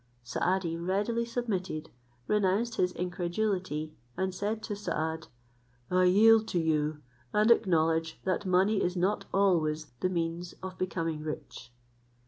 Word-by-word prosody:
Saadi 170 +7 0
readily 205 +7 0
submitted, 200 -10 -3 0.3
renounced 210 +3 +1
his 180 0 +2
incredulity; 180 -3 -2 0.2
and 190 0 -1
said 210 +3 -2
to 210 - -3
Saad, 160 -5 -3 0.6
"I 185 0 +4
yield 220 +4 +6
to 175 - 0
you, 155 -2 0 0.3
and 215 +2 +4
acknowledge 165 -6 +2
that 190 +1 0
money 190 +2 +3
is 180 +1 0
not 190 +4 +1
always 160 -6 +1
the 185 - +1
means 170 0 -2
of 190 -1 -5
becoming 165 -4 -2
rich." 150 -5 -7
185 Hz, 125 wpm, -30 LUFS, 165-200 Hz, 0.6 s, yield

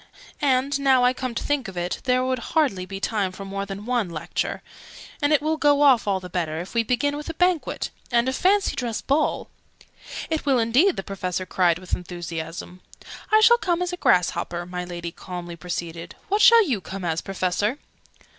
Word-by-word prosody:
"And, 275 0 +2
now 265 -2 +4
I 250 +1 +4
come 255 -2 -4
to - - -2
think 290 -5 -1
of 190 -2 -9
it, 175 +1 -2
there 255 0 +2
would 255 -1 0 0.2
hardly 195 -13 +1
be 195 +1 -6
time 200 -2 -1
for 195 +1 -9
more 195 +1 -4
than 200 +1 -7
one 240 -6 0
Lecture. 165 0 -3 0.6
And 290 +1 +2
it 295 -1 +3
will 315 +1 0
go 290 -1 +4
off 260 -7 +5
all 195 -1 +1
the 185 - -9
better, 165 -3 -2
if 175 - -7
we 230 - +3
begin 255 +5 0
with 295 +2 -6
a 325 - -5
Banquet, 360 -2 0 0.2
and 235 +1 +3
a 260 - 0
Fancy 395 +7 +2
dress 235 -3 -2
Ball 295 +3 0 0.4
" - - -10
"It 320 - 0
will 275 -3 +3
indeed!" 250 +12 +3
the 195 - -4
Professor 185 -2 -3
cried, 175 -2 +2
with 180 0 -9
enthusiasm. 175 0 -5 0.5
"I 435 0 +6
shall 475 +2 +6
come 350 -7 0
as 360 0 -3
a - - -3
Grass 180 - +3
hopper," 170 0 -4
my 180 0 -5
Lady 175 -1 -6
calmly 175 -1 -7
proceeded. 170 0 -6
"What 410 +2 +2
shall 460 -3 +7
you 235 -9 0
come 190 0 -6
as, 160 -1 -1
Professor?" 195 +5 -1
220 Hz, 205 wpm, -24 LUFS, 180-285 Hz, 0.6 s, shall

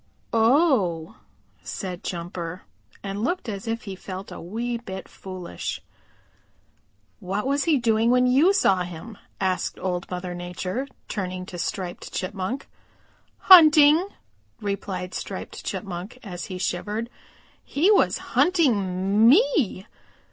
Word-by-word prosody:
"Oh," 225 - +2 0.4
said 180 -2 -6
Jumper 170 0 -5 0.4
and 200 +1 -4
looked 350 +3 -1
as 205 0 -5
if 230 +1 -2
he 195 -2 -6
felt 190 +1 -8
a - - -8
wee 235 +7 -3
bit 190 -5 -7
foolish. 185 -2 -6 1.4
"What 195 +3 -3
was 280 +1 +1
he 320 -4 +4
doing 230 -2 +2
when 250 0 +4
you 275 +9 +5
saw 195 - +3
him?" 180 +5 -7 0.2
asked 185 -1 -1
Old 180 -1 -3
Mother 180 0 -4
Nature, 180 +8 -4 0.2
turning 185 -3 -4
to 180 -2 -8
Striped 180 0 -4
Chipmunk. 195 +7 -4 0.7
"Hunting," 315 -1 +8 0.5
replied 195 -3 -4
Striped - - -6
Chipmunk, 190 +3 -5
and 180 -5 -7
shivered. 195 +4 -3 0.6
"He 340 +9 +2
was 410 - +4 0.2
hunting 210 - +3
me. 320 - +3
200 Hz, 115 wpm, -24 LUFS, 185-250 Hz, 1.4 s, Hunting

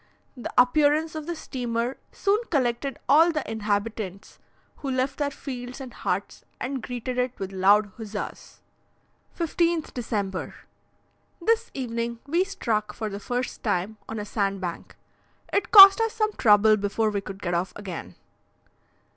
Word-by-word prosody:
The 245 - -6
appearance 300 +5 +3
of 310 -1 -6
the 345 - -3
steamer 245 -4 -3 0.2
soon 405 +1 +1
collected 265 -1 0
all 320 +5 +6
the 305 -3 -3
inhabitants, 205 -2 -3 0.4
who 275 - -5
left 260 +2 -1
their 290 -1 +1
fields 255 -2 -7
and 260 -3 -8
huts 190 +3 -3 0.2
and 265 0 -3
greeted 245 +1 -4
it 250 0 -1
with 195 -1 -5
loud 200 +2 +4
huzzas. 215 -2 -7 0.7
15th 335 -1 0
December. 205 -6 -3 0.8
This 455 +6 +1
evening 235 -2 -3
we 335 +6 +2
struck, 215 - -2
for 220 -2 -3
the 200 0 -6
first 245 +4 -3
time, 205 0 -1
on 225 - -4
a 210 - -4
sandbank. 195 -4 -3 0.6
It 400 - +1
cost 390 0 +11
us 450 -1 0
some 430 -1 0
trouble 215 - +5
before 205 +2 0
we 200 -1 -2
could 195 0 -8
get 175 -3 -3
off 175 +2 -1
again. 180 - -7
240 Hz, 145 wpm, -25 LUFS, 205-290 Hz, 0.8 s, cost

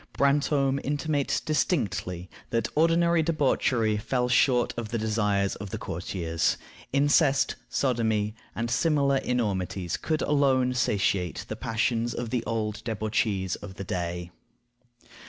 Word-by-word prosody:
Brantome 140 -1 +2
intimates 145 0 0
distinctly 95 - -1 0.2
that 115 -1 0
ordinary 165 +1 +3
debauchery 130 -8 +1
fell 125 +4 0
short 125 -1 +3
of 115 -2 -4
the 115 - -1
desires 105 -3 +1
of 100 0 -7
the - - -4
courtiers; 85 -1 -1 0.3
incest, 140 0 +3
sodomy, 110 -5 0 0.2
and 115 +1 -2
similar 140 0 +2
enormities 95 -8 -1
could 155 -1 -1
alone 135 -3 +2
satiate 95 -6 0
the 110 - -3
passions 115 0 -1
of 120 -2 -4
the 125 - 0
old 110 -2 -2
debauchees 105 -4 -1
of 95 -2 -10
the 100 - -6
day. 90 -1 -4
115 Hz, 120 wpm, -27 LUFS, 100-140 Hz, 0.3 s, ordinary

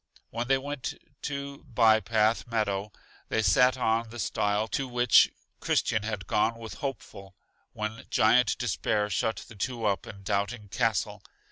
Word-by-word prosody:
When 120 +1 -3
they 135 +1 +4
went 140 0 -5 0.3
to 140 -1 -5
By 115 -4 +4
Path 110 +1 +1
Meadow 105 -3 -1 0.4
they 110 - +1
sat 125 +7 +4
on 115 -2 +1
the 120 - -9
stile 105 -1 0
to 135 - -2
which 120 -1 +5 0.3
Christian 110 - +1
had 105 -2 -4
gone 110 +5 +1
with 115 -1 -8
Hopeful, 105 -8 -7 0.4
when 110 +1 -5
Giant 120 +4 +4
Despair 105 -3 -1
shut 110 +4 -1
the 115 - -13
two 115 +2 -3
up 100 -2 0
in 100 -1 -10
Doubting 100 +2 -2
Castle. 115 -2 0
110 Hz, 150 wpm, -28 LUFS, 105-120 Hz, 0.4 s, which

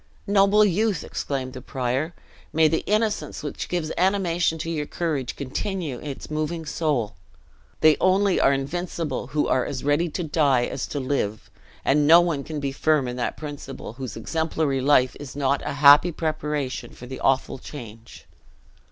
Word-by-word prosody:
"Noble 205 +1 +5
youth!" 205 -2 +1
exclaimed 130 -2 -4
the 130 - -8
prior, 130 +6 -2 0.4
"may 160 0 +4
the 160 +1 0
innocence 210 -9 0
which 145 - -5
gives 165 -3 -2
animation 180 -3 +1
to 165 +1 -4
your 150 -3 -2
courage, 150 -8 -2
continue 150 - -3
its 145 0 -7
moving 155 +2 -2
soul! 145 -9 -1 0.7
They 155 -1 +6
only 190 +1 +3
are - - +4
invincible 160 +4 -3
who 150 0 0
are 130 - +2
as 130 - -5
ready 145 +4 +2
to 175 +3 -3
die 145 -6 +2
as - - -4
to 145 - -4
live; 130 -6 -2 0.3
and 145 +1 +3
no 165 +2 +9
one 165 -5 0
can 155 0 -5
be 140 -1 -2
firm 150 -1 +1
in 125 - -4
that 120 - -2
principle, 145 -6 -7
whose 130 -1 -7
exemplary 155 +1 -1
life 130 -2 +3
is 145 -2 -8
not 140 0 +1
a - - -3
happy 145 +4 +7
preparation 150 -4 -3
for 125 - -11
the 130 +1 -7
awful 135 0 +1
change." 115 -6 -11
150 Hz, 165 wpm, -24 LUFS, 135-165 Hz, 0.7 s, no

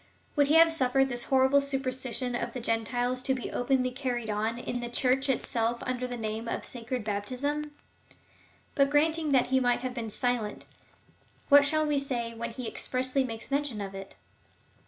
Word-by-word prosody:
Would 285 -1 +4
he 300 - +3
have 330 0 +8
suiFered 270 -3 +2
this 240 -1 -2
horrible 265 +1 +4
superstition 260 -2 -2
of 240 - -3
the 255 - -4
Gentiles 245 +2 -1
to 265 +1 +1
be 255 - -5
openly 255 0 +1
carried 245 -4 -3
on 220 +2 -1
in 245 0 -4
the 240 0 -4
Church 260 +3 +1
itself 235 -2 0
under 255 0 -2
the 245 -1 -5
name 220 +1 -4
of - - -3
sacred 245 0 -4
baptism? 255 +9 -2 1.0
But 275 -1 +3
granting 310 +1 +2
that 260 -3 +3
he 265 - +5
might 245 -1 +1
have 255 -1 -3
been 235 -3 -4
silent, 230 -1 -2 0.8
what 285 0 +8
shall 310 +1 +2
we 295 -2 +1
say 240 -4 -3
when 235 +1 -4
he 235 +1 -6
expressly 260 +3 0
makes 230 0 -6
mention 280 -5 -1
of 195 -1 -5
it 195 0 -9
255 Hz, 180 wpm, -29 LUFS, 235-275 Hz, 1.0 s, have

